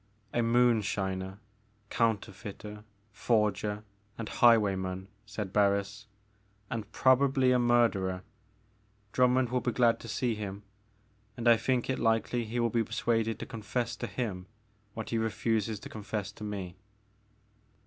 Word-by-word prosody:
A -, -, +1 dB
moonshiner, 105 Hz, -5 st, +1 dB, 0.5 s
counterfeiter, 105 Hz, -1 st, -2 dB, 0.3 s
forger, 105 Hz, -2 st, 0 dB, 0.3 s
and 115 Hz, -, -5 dB
highwayman, 95 Hz, -5 st, +3 dB, 0.2 s
said 105 Hz, -3 st, -5 dB
Barris, 100 Hz, 0 st, +1 dB, 0.6 s
and 110 Hz, -2 st, -4 dB
probably 130 Hz, 0 st, +4 dB
a 125 Hz, -, +4 dB
murderer. 115 Hz, -7 st, +2 dB, 0.9 s
Drummond 125 Hz, 0 st, +3 dB
will 125 Hz, 0 st, 0 dB
be 120 Hz, -, 0 dB
glad 120 Hz, -1 st, +3 dB
to -, -, -10 dB
see 120 Hz, +2 st, 0 dB
him, 105 Hz, -1 st, -6 dB, 0.7 s
and 120 Hz, 0 st, -2 dB
I 120 Hz, -, +8 dB
think 120 Hz, +2 st, 0 dB
it 130 Hz, -, -1 dB
likely 115 Hz, +1 st, +1 dB
he 115 Hz, +3 st, -3 dB
will 115 Hz, -1 st, +1 dB
be 115 Hz, 0 st, +2 dB
persuaded 115 Hz, 0 st, 0 dB
to -, -, -6 dB
con 115 Hz, -, -8 dB
fess 120 Hz, +2 st, -2 dB
to -, -, -4 dB
him 95 Hz, -7 st, -4 dB, 0.5 s
what 110 Hz, -2 st, -5 dB
he 115 Hz, -, +1 dB
refuses 110 Hz, 0 st, 0 dB
to -, -, -8 dB
confess 105 Hz, -2 st, -4 dB
to 105 Hz, -, -11 dB
me. 95 Hz, -4 st, -5 dB
110 Hz, 135 wpm, -30 LUFS, 100-120 Hz, 0.9 s, I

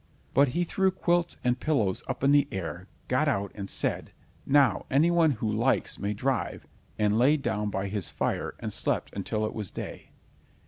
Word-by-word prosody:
But 140 Hz, +2 st, +5 dB
he 175 Hz, -, +3 dB
threw 190 Hz, +2 st, +1 dB
quilts 175 Hz, -2 st, 0 dB
and 125 Hz, 0 st, +1 dB
pillows 115 Hz, -13 st, +1 dB
up -, -, -4 dB
in 140 Hz, -, +5 dB
the 145 Hz, 0 st, +5 dB
air, 95 Hz, -3 st, -5 dB, 0.2 s
got -, -, +2 dB
out 100 Hz, 0 st, 0 dB
and 100 Hz, -2 st, -6 dB
said: -, -, -2 dB, 0.4 s
"Now 135 Hz, -6 st, +3 dB
any 150 Hz, +6 st, +4 dB
one 170 Hz, -2 st, +4 dB
who 110 Hz, -2 st, -3 dB
likes 115 Hz, +5 st, +1 dB
may 105 Hz, +1 st, -2 dB
drive," 130 Hz, +3 st, -2 dB, 0.3 s
and 105 Hz, +1 st, +2 dB
lay 140 Hz, +5 st, +5 dB
down 105 Hz, -7 st, -1 dB
by 95 Hz, -1 st, -2 dB
his 100 Hz, -2 st, -2 dB
fire, -, -, -2 dB
and -, -, -4 dB
slept -, -, -1 dB
until 110 Hz, 0 st, -1 dB
it -, -, -4 dB
was 105 Hz, -5 st, -3 dB
day. -, -, -7 dB
125 Hz, 185 wpm, -28 LUFS, 105-145 Hz, 0.4 s, But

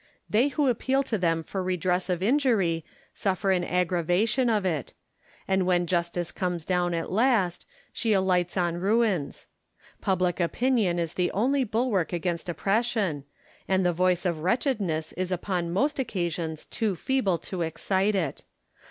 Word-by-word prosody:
They 230 Hz, +6 st, +3 dB
who 290 Hz, 0 st, 0 dB
appeal 260 Hz, +3 st, +1 dB
to 230 Hz, -5 st, -1 dB
them 165 Hz, -2 st, +1 dB
for 190 Hz, +4 st, -4 dB
redress 180 Hz, 0 st, 0 dB
of 180 Hz, 0 st, -1 dB
injury 215 Hz, -, +2 dB, 0.3 s
suffer 195 Hz, 0 st, 0 dB
an 180 Hz, -2 st, +2 dB
aggravation 180 Hz, +8 st, +1 dB
of 210 Hz, -4 st, +1 dB
it; 160 Hz, -7 st, -2 dB, 0.5 s
and 190 Hz, -1 st, +2 dB
when 175 Hz, -1 st, +2 dB
Justice 170 Hz, 0 st, -1 dB
comes 175 Hz, -3 st, -3 dB
down 175 Hz, -2 st, +1 dB
at 165 Hz, -, -3 dB
last, 210 Hz, -5 st, +2 dB, 0.3 s
she 225 Hz, -, 0 dB
alights 185 Hz, -2 st, +2 dB
on 175 Hz, -1 st, +1 dB
ruins. 195 Hz, -6 st, 0 dB, 0.5 s
Public 180 Hz, -2 st, 0 dB
opinion 205 Hz, 0 st, +1 dB
is 170 Hz, -1 st, -2 dB
the 180 Hz, -1 st, 0 dB
only 265 Hz, +6 st, +2 dB
bulwark 220 Hz, -6 st, 0 dB
against 175 Hz, 0 st, -2 dB
oppression, 195 Hz, -, 0 dB, 0.4 s
and 190 Hz, -1 st, +2 dB
the 175 Hz, -, +3 dB
voice 180 Hz, +1 st, +1 dB
of 170 Hz, -3 st, 0 dB
wretchedness 185 Hz, -, 0 dB
is 185 Hz, +1 st, -3 dB
upon 180 Hz, -1 st, -1 dB
most 275 Hz, -, 0 dB
occasions 170 Hz, -, -3 dB
too 215 Hz, -4 st, -1 dB
feeble 205 Hz, -4 st, 0 dB
to 180 Hz, +1 st, -6 dB
excite 190 Hz, +5 st, 0 dB
it. 165 Hz, -8 st, -2 dB
185 Hz, 150 wpm, -27 LUFS, 175-215 Hz, 0.5 s, They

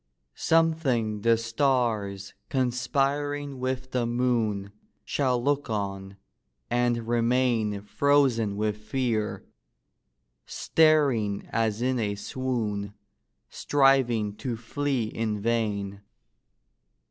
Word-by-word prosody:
Something 140 Hz, -10 st, +1 dB
the 115 Hz, +1 st, +4 dB
stars, 115 Hz, -5 st, 0 dB, 0.2 s
conspiring 140 Hz, +2 st, -1 dB
with 130 Hz, 0 st, -3 dB
the 125 Hz, -2 st, 0 dB
moon, 115 Hz, -5 st, 0 dB, 0.3 s
Shall 130 Hz, -3 st, +1 dB
look 140 Hz, +1 st, 0 dB
on, 100 Hz, -2 st, -4 dB, 0.5 s
and 120 Hz, -1 st, +1 dB
remain 115 Hz, -3 st, +1 dB
Frozen 120 Hz, -4 st, +2 dB
with 105 Hz, 0 st, -1 dB
fear; 110 Hz, -1 st, -2 dB, 1.0 s
staring 140 Hz, -11 st, +2 dB
as 115 Hz, 0 st, 0 dB
in 130 Hz, -1 st, +1 dB
a 105 Hz, -2 st, -1 dB
swoon, 105 Hz, -3 st, -3 dB, 0.6 s
Striving 130 Hz, -7 st, +2 dB
to 120 Hz, -3 st, -3 dB
flee 135 Hz, +2 st, -1 dB
in 110 Hz, -1 st, -2 dB
vain. 100 Hz, -3 st, -1 dB
120 Hz, 90 wpm, -27 LUFS, 105-130 Hz, 1.0 s, the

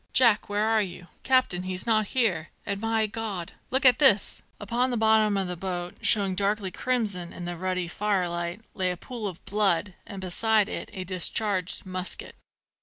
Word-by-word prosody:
"Jack, 230 Hz, -6 st, +4 dB
where 205 Hz, +1 st, +1 dB
are 220 Hz, -1 st, +3 dB
you? 175 Hz, -3 st, -6 dB
Captain, 255 Hz, -9 st, +2 dB
he's 185 Hz, 0 st, -4 dB
not 215 Hz, -2 st, +2 dB
here! 180 Hz, -10 st, +1 dB, 0.2 s
and 200 Hz, 0 st, -3 dB
my 225 Hz, -1 st, +1 dB
God! 210 Hz, -5 st, -4 dB, 0.2 s
look 265 Hz, +1 st, 0 dB
at 255 Hz, +2 st, +7 dB
this!" 230 Hz, -9 st, +5 dB, 0.2 s
Upon 235 Hz, +5 st, 0 dB
the 245 Hz, -, -1 dB
bottom 220 Hz, -2 st, +3 dB
of 190 Hz, -1 st, -1 dB
the 180 Hz, -, -3 dB
boat, 175 Hz, 0 st, -4 dB
showing 200 Hz, -3 st, +4 dB
darkly 200 Hz, 0 st, 0 dB
crimson 205 Hz, -8 st, -1 dB
in 175 Hz, -, -7 dB
the 175 Hz, 0 st, -4 dB
ruddy 185 Hz, 0 st, -2 dB
firelight, 175 Hz, -1 st, -1 dB
lay 185 Hz, -1 st, 0 dB
a 180 Hz, -, -3 dB
pool 230 Hz, +3 st, -6 dB
of 180 Hz, -3 st, -9 dB
blood, 205 Hz, -2 st, +1 dB
and 195 Hz, -, -7 dB
beside 210 Hz, +3 st, +2 dB
it -, -, -4 dB
a 190 Hz, -3 st, -5 dB
discharged 185 Hz, +1 st, -1 dB
musket. 185 Hz, -1 st, -4 dB
200 Hz, 180 wpm, -26 LUFS, 180-220 Hz, 0.2 s, at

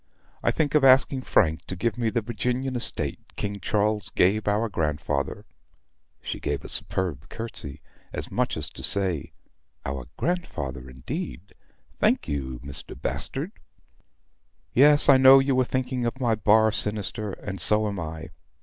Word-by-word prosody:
I -, -, +2 dB
think 150 Hz, -3 st, 0 dB
of 150 Hz, -2 st, +4 dB
asking 135 Hz, 0 st, +5 dB
Frank 80 Hz, -10 st, +1 dB
to 90 Hz, -, -6 dB
give 115 Hz, +6 st, -1 dB
me 120 Hz, -2 st, 0 dB
the 115 Hz, 0 st, -1 dB
Virginian 125 Hz, +4 st, -2 dB
estate 120 Hz, -, +2 dB, 0.2 s
King 100 Hz, 0 st, -4 dB
Charles 105 Hz, 0 st, 0 dB
gave 105 Hz, +4 st, +2 dB
our 105 Hz, +3 st, +1 dB
grandfather. 75 Hz, -6 st, -2 dB, 0.8 s
(She -, -, -4 dB
gave -, -, -3 dB
a -, -, -7 dB
superb 85 Hz, -7 st, -1 dB
curtsy, 110 Hz, -, -6 dB, 0.3 s
as -, -, -3 dB
much -, -, -1 dB
as -, -, +2 dB
to -, -, -9 dB
say, 95 Hz, -6 st, 0 dB, 0.5 s
'Our 65 Hz, -2 st, -4 dB
grandfather, 70 Hz, -, -3 dB
indeed! 90 Hz, -, -6 dB, 0.5 s
Thank -, -, +2 dB
you, 65 Hz, -4 st, -4 dB
Mr. 70 Hz, -1 st, -6 dB
Bastard.') -, -, -3 dB, 1.2 s
Yes, 145 Hz, +3 st, +6 dB
I 140 Hz, -, +8 dB
know 130 Hz, +1 st, +9 dB
you 135 Hz, -1 st, +2 dB
are -, -, +4 dB
thinking 125 Hz, -1 st, -2 dB
of 125 Hz, +3 st, -4 dB
my 120 Hz, -3 st, +2 dB
bar 110 Hz, 0 st, +4 dB
sinister, 105 Hz, -1 st, -1 dB
and 95 Hz, -1 st, -6 dB
so 105 Hz, 0 st, +3 dB
am 100 Hz, -2 st, -4 dB
I. 80 Hz, +1 st, -6 dB
105 Hz, 150 wpm, -25 LUFS, 80-125 Hz, 1.2 s, know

